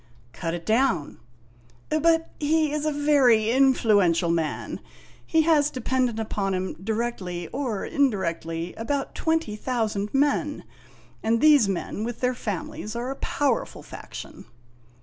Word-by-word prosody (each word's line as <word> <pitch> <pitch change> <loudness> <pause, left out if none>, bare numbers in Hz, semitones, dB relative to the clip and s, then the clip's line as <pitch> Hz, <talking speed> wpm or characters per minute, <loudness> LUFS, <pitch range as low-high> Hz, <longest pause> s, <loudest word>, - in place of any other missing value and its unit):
" 120 +1 -31
Cut 165 0 -1
it 170 - -8
down." 220 - +1 0.4
" 120 0 -30
But 325 0 +3
he 310 0 +2
is 300 0 -1
a - - +2
very 270 -7 +4
influential 210 -10 +3
man; 160 -3 -2 0.4
he 320 -1 +2
has 300 -3 +4
dependent 255 -3 -1
upon 200 -3 -1
him, 185 0 -2
directly 210 -6 -3
or 250 -7 -3
indirectly, 170 - -1
about 275 +5 -2
twenty 320 -10 0
thousand 215 -3 -2
men, 290 +1 +1 0.6
and 230 +1 +1
these 290 -7 +6
men, 195 +2 -3
with 235 0 -4
their 250 0 +1
families, 210 -1 -5
are 245 +3 -3
a - - -4
powerful 275 -5 -1
faction. - - -10
230 Hz, 135 wpm, -25 LUFS, 190-285 Hz, 0.6 s, these